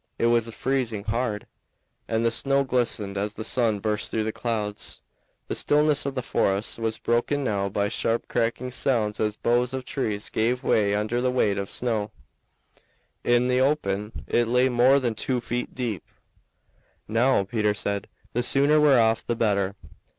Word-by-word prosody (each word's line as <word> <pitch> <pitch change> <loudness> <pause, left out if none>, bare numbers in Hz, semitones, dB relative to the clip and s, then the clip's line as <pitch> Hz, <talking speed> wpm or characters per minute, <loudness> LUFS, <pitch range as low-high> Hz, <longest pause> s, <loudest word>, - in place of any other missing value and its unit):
It - - 0
was 115 -1 +2
freezing 125 -6 -1
hard, 110 -1 -2 0.6
and 115 0 0
the 115 - +3
snow 135 +4 +1
glistened 115 -6 0
as 105 +1 -3
the 110 - -5
sun 115 -3 +1
burst 105 +1 -2
through 110 - -1
the 110 - -2
clouds. 105 -3 -3 0.5
The - - -3
stillness 150 0 +3
of 140 - -4
the 130 - -2
forest 100 +2 0
was 110 -1 -1
broken 120 +5 0
now 100 -5 -1
by 100 +1 0
sharp 115 +2 -1
cracking 120 +2 -1
sounds 115 -5 0
as 105 -1 0
boughs 120 +2 +1
of 130 -1 -4
trees 105 -7 -3
gave 120 +3 0
way 100 -1 +2
under 110 +4 -1
the 125 - +1
weight 105 -6 +1
of 100 - -3
the - - -9
snow; 110 -4 -2 1.1
in 120 +1 +3
the 125 0 +2
open 105 -7 -1
it 120 -1 +1
lay 125 +2 +3
more 125 +3 +4
than 120 -4 -1
two 125 +3 -1
feet 120 +1 -4
deep. 115 -9 -3 1.0
"Now," 115 0 +2
Peter 105 +1 0
said, 100 -1 -2 0.3
"the 120 - +1
sooner 140 +4 +4
we're 140 -4 +5
off 110 -1 +2
the 120 - -2
better." 100 -4 0
115 Hz, 170 wpm, -25 LUFS, 105-125 Hz, 1.1 s, we're